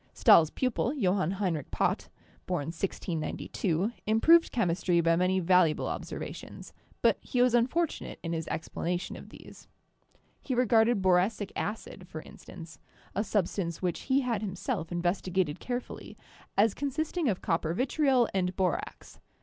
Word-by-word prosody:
Stahl's 160 -2 +6
pupil, 255 - -1
Johann 190 - +1
Heinrich 175 -8 -2
Pott - - -1 0.4
(born 170 -5 -2
1692), 175 +2 -2 0.2
improved 325 +11 +5
chem 225 -8 +1
istry 170 0 +1
by 165 0 +4
many 185 +2 +2
valuable 180 -3 +3
observations, - - -6 0.3
but - - +4
he 250 - -3
was 250 -1 +4
unfor 250 +9 +3
tunate - - -8
in 165 -1 -3
his 165 -1 -3
explanation 175 +2 -3
of - - -11
these. - - -14 0.7
He 260 - -2
regarded 230 -3 +3
boracic 190 +3 +2
acid, 200 -3 -5
for 155 -2 -8
instance 165 -2 -12 0.2
— - - -28
a 205 - +1
substance 190 -4 -2
which 180 -2 -1
he 265 +1 +4
had 235 -5 -1
himself 185 -4 -3
in 175 0 -2
vestigated 180 -3 0
carefully 245 0 -6 0.2
— - - -26
as 205 +1 +4
consisting 300 +2 -1
of 190 - -2
copper 165 -1 0
vitriol 260 - +2
and 185 -1 0
borax. 185 -3 -3
190 Hz, 150 wpm, -29 LUFS, 175-240 Hz, 0.7 s, Stahl's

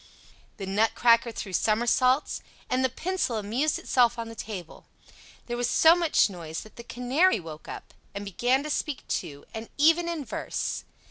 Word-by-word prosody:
The 195 - -5
Nutcracker 230 +4 +3
threw 200 -3 -6
somersaults, 240 - +2 0.3
and 255 +1 +2
the 260 - +3
Pencil 340 -1 -2
amused 235 +9 0
itself 240 -2 +2
on 230 -1 -5
the - - -8
table; 195 -7 -8 0.6
there 240 - -3
was 245 0 0
so 325 +1 +6
much 340 -3 +3
noise 165 -5 -6
that 215 - -14
the 235 - -9
Canary 255 +10 +2
woke 160 -3 -10
up, - - -9 0.2
and 200 0 -5
began 245 +8 +1
to 305 - -4
speak 295 -2 -3
too, 140 -1 -4
and 225 0 -7
even 330 +4 +4
in 320 -5 -3
verse. 225 - -3
240 Hz, 165 wpm, -27 LUFS, 215-280 Hz, 0.6 s, so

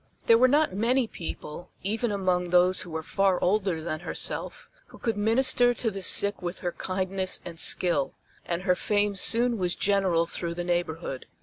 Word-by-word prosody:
There 230 0 +6
were 255 - +6
not 295 -2 +2
many 240 +6 +1
people, 170 -4 -8
even 220 +4 -1
among 185 -3 0
those 180 +1 +4
who 175 - -7
were 160 0 -4
far 195 +2 +1
older 190 -4 0
than 155 -1 -3
herself, - - -4 0.2
who - - -15
could 225 -3 -2
minister 245 +3 +3
to 225 -2 -1
the 195 -1 -6
sick 200 +2 +3
with 175 0 -5
her 175 - -2
kindness 185 +1 -2
and 170 -2 -8
skill, 170 -7 +1 0.3
and 175 +1 -3
her 180 -2 +3
fame 205 +2 0
soon 235 +4 +2
was 180 -1 0
general 190 -4 +2
through 170 0 -5
the 175 - -3
neighborhood. 175 -5 -3
185 Hz, 180 wpm, -26 LUFS, 175-215 Hz, 0.3 s, There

